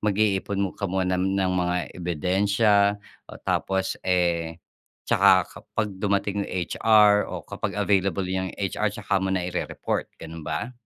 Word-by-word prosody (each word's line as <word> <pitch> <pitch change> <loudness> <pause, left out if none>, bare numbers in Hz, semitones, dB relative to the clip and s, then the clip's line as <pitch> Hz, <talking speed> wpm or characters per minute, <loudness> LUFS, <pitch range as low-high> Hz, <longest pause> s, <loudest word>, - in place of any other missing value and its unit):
mag-iipon 100 -2 0
ka 100 - -4
muna 90 0 0
ng 95 -1 +1
mga 90 -1 0 0.2
ebidensiya, 100 +5 +2 0.3
oh - - -10
tapos, 95 0 0
eh, 85 -3 0 0.5
tsaka - - +5 0.2
kapag 110 -2 -3
dumating 100 0 0
yung - - -8 0.2
HR, 105 -2 +5
o - - -6
kapag - - -5
available 95 -1 +1
yung 95 0 -2
H-R 100 +2 -1
tsaka 100 -2 -1
muna 95 -1 -1
i-re-report, 90 - -3
gano'n 80 0 -9
ba? 120 +10 -4
95 Hz, 135 wpm, -25 LUFS, 90-100 Hz, 0.5 s, tsaka